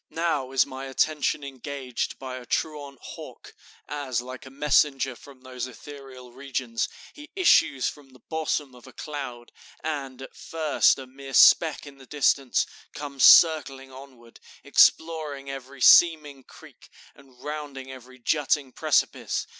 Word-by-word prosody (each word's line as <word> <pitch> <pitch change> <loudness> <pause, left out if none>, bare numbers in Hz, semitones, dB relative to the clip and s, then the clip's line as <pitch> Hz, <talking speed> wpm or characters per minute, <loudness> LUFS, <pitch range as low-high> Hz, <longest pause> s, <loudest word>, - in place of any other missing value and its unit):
Now 155 -6 -2
is 135 -1 +3
my 135 0 -8
attention 145 +2 0
engaged 135 -1 -5
by 130 -1 -7
a 125 - -11
truant 145 -3 -3
hawk, - - -11 0.3
as, 140 -5 -3
like 130 +2 -9
a - - -10
messenger 135 -2 +1
from 135 +1 -16
those 130 -1 -6
ethereal 130 -1 -12
regions, 130 -3 -4 0.2
he 295 0 -13
issues 240 - +3
from 145 -2 -8
the 130 - -18
bosom 150 -1 -3
of 125 +1 -16
a 130 - -14
cloud, 135 -6 -7 0.3
and, 135 -4 -5
at - - -12
first 160 -2 +1
a 135 - -8
mere 135 +1 -9
speck 160 -3 +5
in 140 -1 -13
the 130 - -15
distance, 140 -2 +1 0.3
comes 140 -2 -4
circling 140 -5 +5
onward, 130 -3 -15 0.2
exploring 150 -4 +2
every 135 0 -10
seeming 150 -6 +5
creek, - - -17 0.2
and 135 -3 -21
rounding 145 -3 -7
every 130 0 -13
jutting 140 +1 0
precipice. - - 0
135 Hz, 140 wpm, -25 LUFS, 130-145 Hz, 0.3 s, speck